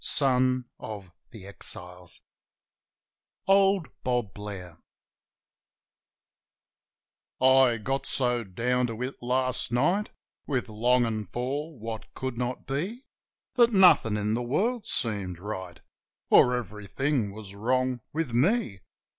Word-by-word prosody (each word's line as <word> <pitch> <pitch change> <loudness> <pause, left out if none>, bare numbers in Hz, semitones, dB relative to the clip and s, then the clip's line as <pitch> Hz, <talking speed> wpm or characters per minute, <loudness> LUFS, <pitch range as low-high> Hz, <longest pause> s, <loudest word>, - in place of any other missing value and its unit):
OLD 130 -2 +2 0.2
BOB 100 -5 -8 0.2
BLAIR 90 -4 -6 1.4
Old 195 -2 +4 0.2
Bob 120 -6 -1
Blair 95 -5 -8 2.6
I 130 -2 +5
GOT 135 +5 -3
so 125 -2 +1
down 125 +6 0
to 115 -1 -6
it 130 +2 -6
last 130 0 0
night, 175 - +1 0.4
With 125 -4 -1
longin' 115 -1 +1
for 140 - -4
what 110 0 -7
could 130 -2 -4
not 125 +1 -3
be, 185 - -3 0.5
That 235 -2 +4
nothin' 180 - +6
in 105 +1 -1
the 120 - 0
world 210 - -1
seemed 100 -6 0
right 95 -2 -7 0.3
— - - -62
Or 125 - +6
everything 110 - -2
was 100 -1 -9
wrong 125 +4 0
with 155 -6 -3
me. 130 - +1
125 Hz, 110 wpm, -27 LUFS, 105-135 Hz, 2.6 s, nothin